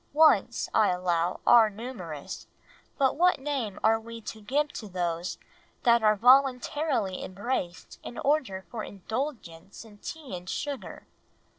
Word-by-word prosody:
Wants, 265 Hz, -7 st, +4 dB
I 215 Hz, -, +5 dB
allow, 180 Hz, -1 st, 0 dB
are 225 Hz, -2 st, +7 dB
numerous, 200 Hz, -, -7 dB, 0.5 s
but 270 Hz, -3 st, +2 dB
what 360 Hz, 0 st, +4 dB
name 265 Hz, -8 st, -3 dB
are 225 Hz, 0 st, +4 dB
we 230 Hz, +1 st, -9 dB
to 220 Hz, 0 st, -8 dB
give 290 Hz, +8 st, 0 dB
to 215 Hz, -, -7 dB
those 175 Hz, -1 st, -2 dB, 0.5 s
that 235 Hz, -2 st, +5 dB
are 215 Hz, -1 st, +4 dB
voluntarily 255 Hz, -2 st, +3 dB
embraced 185 Hz, -2 st, -4 dB
in -, -, -9 dB
order 250 Hz, -, 0 dB
for 220 Hz, -2 st, -4 dB
indulgence 205 Hz, -, -6 dB
in 205 Hz, -2 st, -16 dB
tea 305 Hz, -, -7 dB
and 180 Hz, +1 st, -8 dB
sugar?... 285 Hz, -3 st, -5 dB
220 Hz, 135 wpm, -28 LUFS, 190-265 Hz, 0.5 s, are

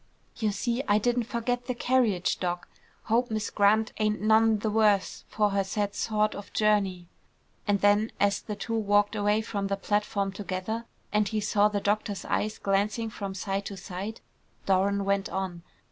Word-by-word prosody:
"You 220 Hz, -3 st, 0 dB
see, 235 Hz, +5 st, -1 dB
I 205 Hz, -, +4 dB
didn't 240 Hz, +2 st, +1 dB
forget 245 Hz, +1 st, -2 dB
the 250 Hz, -, -1 dB
carriage, 235 Hz, -8 st, +1 dB
Doc. 175 Hz, -1 st, -2 dB, 0.4 s
Hope 240 Hz, +3 st, +1 dB
Miss 215 Hz, -1 st, -2 dB
Grant 215 Hz, +2 st, +3 dB
ain't 215 Hz, 0 st, +1 dB
none 220 Hz, +1 st, +4 dB
the 210 Hz, +1 st, -2 dB
worse 210 Hz, -3 st, +2 dB
for 210 Hz, -1 st, +1 dB
her 195 Hz, 0 st, +1 dB
sad 205 Hz, +1 st, -2 dB
sort 215 Hz, -1 st, 0 dB
of 205 Hz, -, -9 dB
journey." 200 Hz, -5 st, +1 dB, 0.6 s
And 200 Hz, -2 st, +2 dB
then 205 Hz, +2 st, +3 dB
as 200 Hz, -1 st, +2 dB
the 210 Hz, -, -5 dB
two 230 Hz, -, -5 dB
walked 205 Hz, -1 st, +2 dB
away 210 Hz, +1 st, +2 dB
from 200 Hz, -3 st, -3 dB
the 195 Hz, 0 st, -1 dB
platform 200 Hz, -1 st, 0 dB
together, 195 Hz, +3 st, -4 dB, 0.3 s
and 210 Hz, -1 st, +3 dB
he 215 Hz, +2 st, -1 dB
saw 210 Hz, 0 st, +3 dB
the 210 Hz, -1 st, -1 dB
doctor's 205 Hz, 0 st, -1 dB
eyes 215 Hz, +1 st, -1 dB
glancing 210 Hz, +3 st, 0 dB
from 200 Hz, -2 st, -5 dB
side 195 Hz, +1 st, -2 dB
to 200 Hz, -, -7 dB
side, 190 Hz, +4 st, -6 dB, 0.4 s
Doran 195 Hz, +1 st, +2 dB
went 200 Hz, 0 st, 0 dB
on. 190 Hz, -3 st, -3 dB
205 Hz, 175 wpm, -28 LUFS, 195-220 Hz, 0.6 s, I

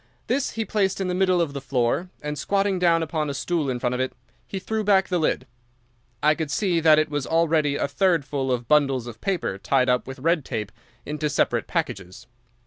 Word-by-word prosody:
This 270 Hz, +2 st, -1 dB
he 225 Hz, -1 st, -2 dB
placed 195 Hz, -3 st, 0 dB
in 190 Hz, -1 st, -1 dB
the -, -, 0 dB
middle 185 Hz, -1 st, +2 dB
of 165 Hz, -4 st, 0 dB
the 140 Hz, -, -5 dB
floor 130 Hz, +6 st, 0 dB
and, 150 Hz, 0 st, -3 dB
squatting 195 Hz, +3 st, 0 dB
down 170 Hz, -2 st, +3 dB
upon 155 Hz, -2 st, -2 dB
a 140 Hz, -, -3 dB
stool 165 Hz, -4 st, -1 dB
in 125 Hz, -, -1 dB
front 125 Hz, 0 st, 0 dB
of 125 Hz, -, -1 dB
it, 130 Hz, -, -2 dB, 0.3 s
he 195 Hz, -, -5 dB
threw 220 Hz, +3 st, -2 dB
back 195 Hz, -2 st, +3 dB
the 180 Hz, -2 st, +1 dB
lid. 150 Hz, -4 st, 0 dB, 0.8 s
I 150 Hz, +1 st, +5 dB
could 155 Hz, -2 st, -4 dB
see 175 Hz, +3 st, +1 dB
that 155 Hz, -1 st, +6 dB
it 155 Hz, -, +3 dB
was 145 Hz, -2 st, -2 dB
already 160 Hz, -3 st, +2 dB
a 145 Hz, -, 0 dB
third 170 Hz, 0 st, +1 dB
full 135 Hz, -2 st, -2 dB
of 120 Hz, -2 st, -2 dB
bundles 135 Hz, -4 st, +3 dB
of 115 Hz, -2 st, -9 dB
paper 185 Hz, -, -2 dB
tied 130 Hz, +3 st, +2 dB
up 125 Hz, 0 st, +1 dB
with 135 Hz, +1 st, -7 dB
red 160 Hz, +3 st, +1 dB
tape 110 Hz, -4 st, -4 dB, 0.3 s
into 150 Hz, +1 st, -2 dB
separate 145 Hz, -, 0 dB
packages. 95 Hz, +7 st, -4 dB
155 Hz, 220 wpm, -24 LUFS, 135-180 Hz, 0.8 s, that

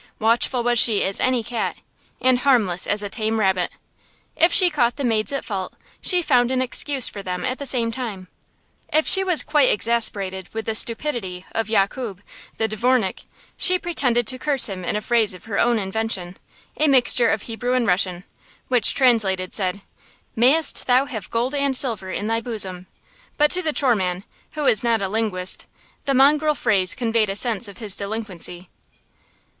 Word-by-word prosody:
Watchful 235 Hz, +2 st, 0 dB
was 240 Hz, -1 st, +2 dB
she 215 Hz, -3 st, +5 dB
as 195 Hz, +1 st, -1 dB
any 255 Hz, -2 st, 0 dB
cat 235 Hz, -1 st, -4 dB, 0.4 s
and 255 Hz, -1 st, +2 dB
harmless 220 Hz, -10 st, +1 dB
as 205 Hz, 0 st, 0 dB
a -, -, -3 dB
tame 220 Hz, +2 st, -2 dB
rabbit. 190 Hz, -3 st, 0 dB, 0.6 s
If 335 Hz, +2 st, +3 dB
she 360 Hz, -1 st, +6 dB
caught 245 Hz, -5 st, 0 dB
the 285 Hz, -, -5 dB
maids 225 Hz, -2 st, 0 dB
at 275 Hz, -, -4 dB
fault, 190 Hz, -4 st, -5 dB, 0.3 s
she 360 Hz, -2 st, +2 dB
found 245 Hz, -6 st, +2 dB
an 260 Hz, 0 st, -1 dB
excuse 260 Hz, +1 st, +2 dB
for 200 Hz, -, -5 dB
them 180 Hz, -1 st, -5 dB
at 255 Hz, 0 st, -3 dB
the 280 Hz, -, -3 dB
same 235 Hz, -2 st, -1 dB
time. 220 Hz, -7 st, -7 dB, 0.6 s
If 310 Hz, +1 st, +2 dB
she 385 Hz, -, +7 dB
was 360 Hz, -4 st, +2 dB
quite 295 Hz, -4 st, +2 dB
exasperated 200 Hz, -5 st, -1 dB
with 225 Hz, -1 st, -4 dB
the 225 Hz, -, -2 dB
stupidity 225 Hz, -6 st, -1 dB
of 225 Hz, -1 st, -3 dB
Yakub, 200 Hz, -1 st, -2 dB, 0.3 s
the 220 Hz, -, 0 dB
dvornik, 220 Hz, -1 st, -1 dB, 0.3 s
she 365 Hz, -1 st, +3 dB
pretended 260 Hz, -10 st, 0 dB
to 255 Hz, +4 st, +2 dB
curse 280 Hz, -1 st, +4 dB
him 190 Hz, -3 st, -7 dB
in 175 Hz, -, -3 dB
a 210 Hz, -, -2 dB
phrase 220 Hz, -3 st, 0 dB
of 180 Hz, -, -15 dB
her 215 Hz, -3 st, -4 dB
own 240 Hz, -1 st, +2 dB
invention, 190 Hz, -3 st, -3 dB, 0.4 s
a 310 Hz, -, +2 dB
mixture 250 Hz, -3 st, +4 dB
of 210 Hz, -, -2 dB
Hebrew 245 Hz, +2 st, -4 dB
and 250 Hz, -2 st, 0 dB
Russian, 180 Hz, -2 st, 0 dB, 0.5 s
which, 250 Hz, -3 st, +1 dB
translated, 205 Hz, -8 st, +1 dB
said, 190 Hz, -1 st, -2 dB, 0.5 s
"Mayst 275 Hz, +7 st, +3 dB
thou 255 Hz, +2 st, +3 dB
have 220 Hz, -8 st, -8 dB
gold 240 Hz, +4 st, -2 dB
and 280 Hz, -2 st, 0 dB
silver 225 Hz, -8 st, +1 dB
in 200 Hz, -, -4 dB
thy 225 Hz, +1 st, -1 dB
bosom"; 190 Hz, -6 st, -1 dB, 0.5 s
but 295 Hz, 0 st, +3 dB
to 365 Hz, -, +1 dB
the 320 Hz, -3 st, -2 dB
choreman, 195 Hz, -11 st, 0 dB, 0.3 s
who 305 Hz, -, -4 dB
was 245 Hz, -6 st, +2 dB
not 230 Hz, -1 st, +1 dB
a -, -, 0 dB
linguist, 190 Hz, -3 st, -2 dB, 0.4 s
the 275 Hz, -, 0 dB
mongrel 300 Hz, +3 st, +3 dB
phrase 195 Hz, -7 st, +1 dB
conveyed 225 Hz, -3 st, 0 dB
a 195 Hz, -, -3 dB
sense 230 Hz, 0 st, +1 dB
of 200 Hz, -2 st, -12 dB
his 210 Hz, -4 st, +1 dB
delinquency. 200 Hz, -4 st, -4 dB
230 Hz, 180 wpm, -21 LUFS, 200-255 Hz, 0.6 s, she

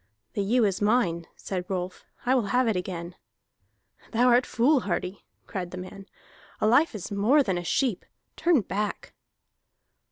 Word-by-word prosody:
"The 205 Hz, -, -1 dB
ewe 225 Hz, +4 st, +3 dB
is 195 Hz, -1 st, -1 dB
mine," 205 Hz, -7 st, +1 dB
said 185 Hz, -2 st, -5 dB
Rolf. 185 Hz, -1 st, -4 dB, 0.2 s
"I 250 Hz, -, +3 dB
will 245 Hz, -6 st, +2 dB
have 250 Hz, +4 st, +2 dB
it 220 Hz, -, +1 dB
again." 180 Hz, -1 st, -4 dB, 1.0 s
"Thou 245 Hz, +2 st, +4 dB
art 245 Hz, +1 st, +4 dB
foolhardy," 215 Hz, -, +1 dB, 0.2 s
cried 180 Hz, -3 st, -4 dB
the 180 Hz, -, -8 dB
man. 190 Hz, +2 st, -9 dB, 0.5 s
"A -, -, +1 dB
life 250 Hz, +5 st, +4 dB
is 195 Hz, -1 st, -6 dB
more 225 Hz, +9 st, +4 dB
than 190 Hz, -7 st, -1 dB
a -, -, -6 dB
sheep. 235 Hz, +3 st, 0 dB, 0.3 s
Turn 335 Hz, -7 st, +3 dB
back!" 205 Hz, +1 st, -4 dB
205 Hz, 155 wpm, -27 LUFS, 185-245 Hz, 1.0 s, Thou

